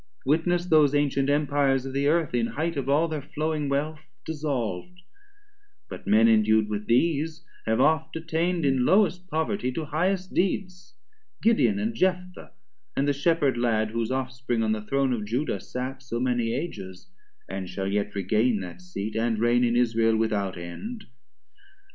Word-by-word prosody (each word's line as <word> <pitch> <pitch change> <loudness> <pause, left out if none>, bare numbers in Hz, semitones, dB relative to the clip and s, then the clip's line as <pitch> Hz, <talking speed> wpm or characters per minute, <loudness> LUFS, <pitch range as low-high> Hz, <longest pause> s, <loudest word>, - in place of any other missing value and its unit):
Witness 170 +5 +1
those 155 -4 +4
antient 140 -1 +1
Empires 145 -2 +2
of 135 - -6
the 140 +1 +1
Earth, 160 -2 +1
In 120 -1 +1
highth 165 +5 -2
of 135 -1 -3
all 150 +4 +3
thir 155 -2 -4
flowing 150 0 -2
wealth 150 +3 -1 0.3
dissolv'd: 145 - -3 0.9
But - - -8
men 110 +2 +5
endu'd 110 -1 +4
with 105 0 -4
these 160 +6 +1 0.2
have 110 0 +1
oft 160 0 +2
attain'd 165 +1 -1
In 135 -2 +2
lowest 185 +2 +3
poverty 160 -3 -1
to 160 +3 -3
highest 185 +5 -1
deeds; 185 0 -2 0.5
Gideon 225 -2 +3
and 215 +3 -1
Jephtha, 180 -2 -2 0.4
and 140 - +1
the 145 - +3
Shepherd 145 -2 +1
lad, 110 -3 +1
Whose 115 0 -2
off 130 0 -2
spring 125 -2 -2
on 110 - +1
the 110 -1 -1
Throne 135 +4 0
of 110 -3 -2
Juda 125 +8 -2
sat 130 +1 -5
440 - - -19
So 120 -1 -3
many 120 -2 0
Ages, 95 - -6 0.4
and 95 -1 -5
shall 95 +1 -3
yet 100 +1 -1
regain 105 +4 +1
That 90 - -8
seat, 110 - -6
and 115 0 0
reign 120 +2 +3
in 120 -1 +2
Israel 115 -2 +2
without 105 -4 -1
end. 205 - -7
135 Hz, 165 wpm, -26 LUFS, 115-160 Hz, 0.9 s, men